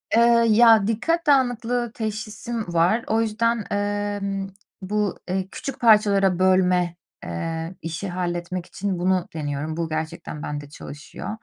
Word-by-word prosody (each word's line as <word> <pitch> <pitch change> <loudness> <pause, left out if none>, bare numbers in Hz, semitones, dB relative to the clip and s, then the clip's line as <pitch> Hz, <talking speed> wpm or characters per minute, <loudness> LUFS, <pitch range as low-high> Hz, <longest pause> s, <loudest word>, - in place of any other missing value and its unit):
Eee, 235 0 +5
ya, 220 -2 +6
dikkat 325 +10 0
dağınıklığı 245 -3 +2
teşhisim 215 -2 -4
var. 180 +8 +3
O 225 +1 +2
yüzden, 230 0 0
emm, 205 -1 -2 0.3
bu, 210 +1 -1
eee, 190 0 -1
küçük 270 -1 -6
parçalara 200 -5 +4
bölme, 180 -2 +3 0.3
eee, 165 - -4
işi 165 +4 -4
halletmek 175 0 -3
için 185 0 -3
bunu 185 0 +1
deniyorum. 150 0 -3
Bu 165 -1 -2
gerçekten 160 -1 -5
bende 145 -1 -5
çalışıyor. 145 +4 -9
195 Hz, 125 wpm, -23 LUFS, 175-225 Hz, 0.3 s, ya